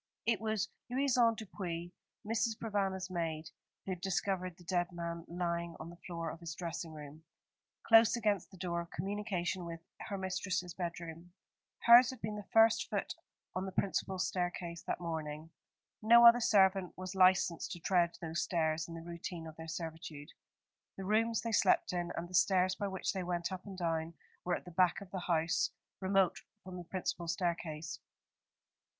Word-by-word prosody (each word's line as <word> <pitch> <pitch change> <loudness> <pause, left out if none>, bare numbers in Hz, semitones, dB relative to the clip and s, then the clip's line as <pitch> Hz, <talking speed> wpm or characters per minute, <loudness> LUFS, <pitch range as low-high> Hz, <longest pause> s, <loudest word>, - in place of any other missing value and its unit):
It 225 -3 +2
was 220 -2 0 0.2
Louison 245 -3 +3
Dupuis, 175 -5 -5 0.3
Mrs. 225 0 0
Provana's 195 -4 -1
maid, 165 -2 -3 0.3
who 195 - -3
had 180 -2 -4
discovered 185 -2 -1
the 175 - -15
dead 175 0 0
man 170 -1 -5
lying 170 -1 -2
on 165 +2 -7
the - - -11
floor 165 -2 -3
of 165 - -9
his 165 -2 -6
dressing 170 -1 -5
room, 150 0 -10 0.6
close 225 0 +7
against 210 -5 0
the 190 - -14
door 170 -1 -2
of 170 - -9
communication 190 -1 -2
with 165 -1 -6 0.2
her 200 - -4
mistress's 185 -1 -2
bedroom. 170 -1 -6 0.5
Hers 240 +1 +9
had 260 -3 -6
been 210 0 -3
the 210 -1 -7
first 225 0 +5
foot - - -2 0.4
on 185 +1 -2
the - - -4
principal 190 0 -1
staircase 175 -2 -2
that - - -1
morning. 160 -2 -4 0.5
No 235 +2 +8
other 235 +1 +9
servant 195 -4 +3
was 185 0 -5
licensed 185 -3 +4
to 175 - -8
tread 175 -1 +2
those 165 0 -2
stairs 160 -2 0
in 165 - -8
the 165 - -7
routine 170 0 -6
of 160 -1 -9
their 160 0 -8
servitude. 160 -3 -6 0.7
The 195 - -5
rooms 225 +2 +2
they 230 - -3
slept 205 - +3
in, 175 -1 -2
and 170 - -4
the 180 - -14
stairs 185 0 +4
by 205 +1 -3
which 190 -1 -2
they 190 - -2
went 175 0 -2
up 185 +1 -6
and 195 -2 -7
down, 165 -1 -1 0.3
were 175 0 +1
at - - -7
the 180 - -9
back 180 +2 +3
of 195 -2 -11
the 190 - -3
house, 170 0 +1 0.3
remote 190 -1 +2 0.2
from 185 0 -8
the 175 - -6
principal 175 -1 -3
staircase. 165 -2 -2
180 Hz, 175 wpm, -34 LUFS, 170-195 Hz, 0.7 s, Hers